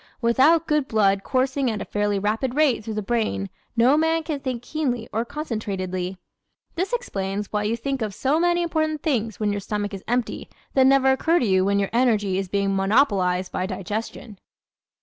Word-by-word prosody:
Without 270 +8 +4
good 300 -4 +1
blood 200 -3 +2
coursing 265 0 0
at 215 -2 -2
a - - -5
fairly 205 -1 0
rapid 220 +6 -1
rate 290 -7 +2
through 220 0 -5
the 215 - -2
brain 195 - -1 0.3
no 245 +5 +5
man 320 +1 +1
can 305 -2 -3
think 255 -3 -4
keenly 245 -6 -2
or 225 +2 0
concentratedly. 195 - -4 0.6
This 370 +6 -2
explains 205 - -3
why 210 0 0
you 225 +2 0
think 270 +2 -3
of 215 -2 -1
so 285 +4 +1
many 345 0 +2
important 315 -2 -1
things 230 - -1
when 210 -1 +1
your 205 0 -2
stomach 205 0 -3
is 195 - -6
empty 245 0 -2 0.2
that 265 -1 +5
never 265 0 +5
occur 320 +6 +2
to 250 - +1
you 190 -2 +3
when 200 +1 +2
your 200 -1 0
energy 215 -6 +2
is 195 -2 -4
being 200 0 0
monopolized 195 -3 +2
by 185 - -2
digestion. 205 +2 -5
230 Hz, 190 wpm, -23 LUFS, 200-275 Hz, 0.6 s, no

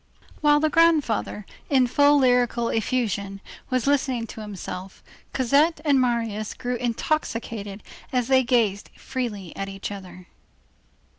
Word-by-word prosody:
While 295 -1 +4
the 310 0 +1
grandfather, 305 -11 +2 0.2
in 265 -3 +4
full 285 +4 +4
lyrical 245 -3 +2
effusion, 210 -4 -1 0.3
was 255 -2 0
listening 265 -4 +1
to 220 - -8
himself, 190 -2 -7 0.3
Cosette 280 +6 +2
and 280 -3 +4
Marius 230 -4 -1
grew 245 0 -3
intoxicated 230 -4 -3 0.3
as 250 -2 0
they 260 -1 +5
gazed 225 -5 +1
freely 220 -9 -5
at 195 0 -4
each 195 +1 -6
other. 185 -2 -9
240 Hz, 125 wpm, -24 LUFS, 205-265 Hz, 0.3 s, they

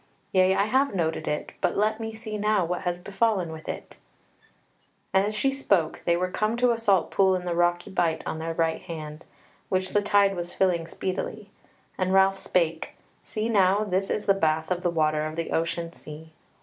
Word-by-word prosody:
Yea, 185 0 +4
I 200 - +2
have 260 +1 +1
noted 160 -3 -1
it 150 - -2
but 180 - 0
let 215 +2 +1
me 225 0 -4
see 220 -1 -7
now 210 -3 +1
what 175 +2 -2
has 175 -2 -2
befallen 195 -1 0
with 160 0 -9
it." - - -7 1.2
As 200 +3 +2
she 270 +6 +2
spoke 200 - +1
they 170 0 +3
were 185 +1 -1
come 215 +4 0
to 250 0 +3
a 230 - -1
salt 200 -6 +2
pool 190 -1 +3
in 180 -1 -4
a 175 - 0
rocky 175 0 +1
bight 170 -4 0
on 160 - -3
their 165 0 -4
right 165 -1 0
hand, 155 -3 -8 0.4
which 185 0 0
the 205 - +2
tide 200 -1 +3
was 175 0 -5
filling 175 -3 +1
speedily; 200 +4 -4 0.5
and 185 0 +1
Ralph 195 0 +4
spake: 165 -4 -1 0.3
"See 215 +1 -3
now, 200 -2 +3
this 195 -1 -1
is 210 - -2
the 195 - +5
bath 160 -3 0
of 180 -1 0
the 180 - +1
water 155 -2 +1
of 155 - -7
the 165 0 -3
ocean 165 +1 -1
sea." 155 0 -11
185 Hz, 200 wpm, -26 LUFS, 165-205 Hz, 1.2 s, the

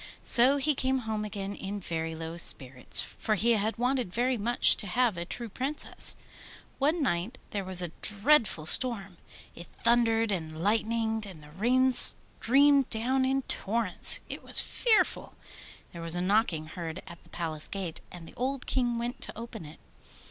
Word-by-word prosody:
So 255 +4 +7
he 295 +2 0
came 265 0 -1
home 215 -1 -4
again 200 -1 -6
in 200 +1 -7
very 165 -3 -5
low 165 +1 -8
spirits, 130 -6 +3
for 215 - -4
he 230 +4 +1
had 220 0 -1
wanted 250 -4 -2
very 245 +5 -1
much 235 +2 +3
to 205 - -7
have 240 +1 0
a 170 0 -6
true 235 +6 -7
Princess. 265 +7 +1 0.6
One 305 +3 0
night 215 +1 -3
there 200 -1 -4
was 185 -1 +4
a 175 - -6
dreadful 210 - 0
storm; 200 -2 +1 0.4
it 170 - -12
thundered 230 -2 0
and 160 -4 -5
lightened 220 +2 -2
and 165 -6 -13
the 150 - -16
rain 250 +9 +1
streamed 275 +2 +3
down 260 +4 -1
in 270 +1 -1
torrents. 215 -4 +2
It - - -8
was - - +8
fearful! 460 -3 0 0.6
There 170 - -9
was 165 0 -1
a 175 - -3
knocking 185 -5 -1
heard 165 +2 -8
at 170 - -14
the - - -24
Palace 160 -3 -4
gate, 185 -5 -6
and 175 -2 -12
the - - -15
old 265 +1 -5
King 240 -2 -1
went 240 +1 -6
to - - -8
open 225 -6 -9
it. 150 +2 -14
220 Hz, 170 wpm, -27 LUFS, 175-245 Hz, 0.6 s, was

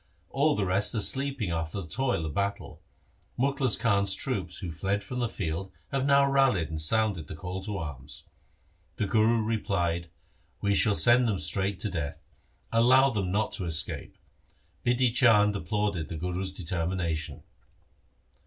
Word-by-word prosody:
All 145 +2 +2
the 100 - 0
rest 95 +6 +1
are - - +1
sleeping 130 -4 +1
after 80 +3 -3
the 90 - -7
toil 125 -4 -1
of 75 - -4
battle. 100 +2 -3 0.6
Mukhlis 135 -2 +2
Khan's 100 -4 +3
troops 105 -2 -3
who 90 -5 -5
fled 95 +5 -2
from 125 +4 -5
the 120 -2 0
field 95 0 -4 0.2
have 135 0 0
now 140 0 +5
rallied 135 -11 +2
and 80 -1 -2
sounded 100 -1 +1
the 80 - -7
call 90 +3 -6
to 105 0 -4
arms.' 75 -4 -7 0.7
The 105 - -1
Guru 110 +2 +2
replied, 90 -6 -1 0.3
' - - -39
We 100 0 +2
shall 100 +1 +3
send 120 +2 +5
them 105 -4 0
straight 95 +1 -1
to 105 - -1
death. 70 -5 -5 0.5
Allow 130 +4 +5
them 100 -5 -2
not 105 +2 0
to 95 - -3
escape.' 80 -2 -2 0.7
Bidhi 125 -1 +2
Chand 105 -5 +5
applauded 100 -2 -2
the 80 - -5
Guru's 90 +3 -3
determination. 85 -2 -3
100 Hz, 160 wpm, -28 LUFS, 85-115 Hz, 0.7 s, now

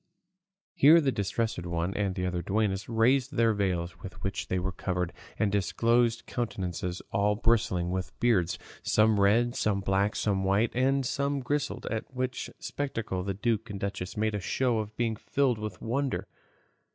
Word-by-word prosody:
Here 155 +5 +7
the 140 -4 +2
Distressed 105 -2 -1
One 85 +2 -2
and 100 -3 -1
the 90 - -1
other 90 -1 -1
duennas 100 +1 -1
raised 125 +4 +2
the 115 -1 +4
veils 90 -4 -1
with 95 - -7
which 100 - -3
they 95 - 0
were 95 +1 -1
covered, 90 -2 -2 0.2
and 105 - +1
disclosed 115 +4 +2
countenances 90 -6 -3
all 105 +1 +2
bristling 105 -6 +1
with 95 0 -4
beards, 90 -8 +2 0.2
some 110 -1 +3
red, 115 +5 +3
some 105 -2 +1
black, 100 +2 +1
some 100 -2 0
white, 100 +4 +2
and 135 +2 +2
some 140 +2 0
grizzled, 145 +3 -2
at 110 +3 -3
which 130 0 -3
spectacle 115 -9 -3
the 95 +1 -3
duke 115 +2 -1
and 100 -1 -5
duchess 100 0 -4
made 110 0 +1
a 105 - -1
show 120 +4 0
of 110 0 -6
being 115 -2 0
filled 125 +1 0
with 105 -4 -5
wonder. 135 +4 -1
105 Hz, 165 wpm, -29 LUFS, 95-120 Hz, 0.2 s, Here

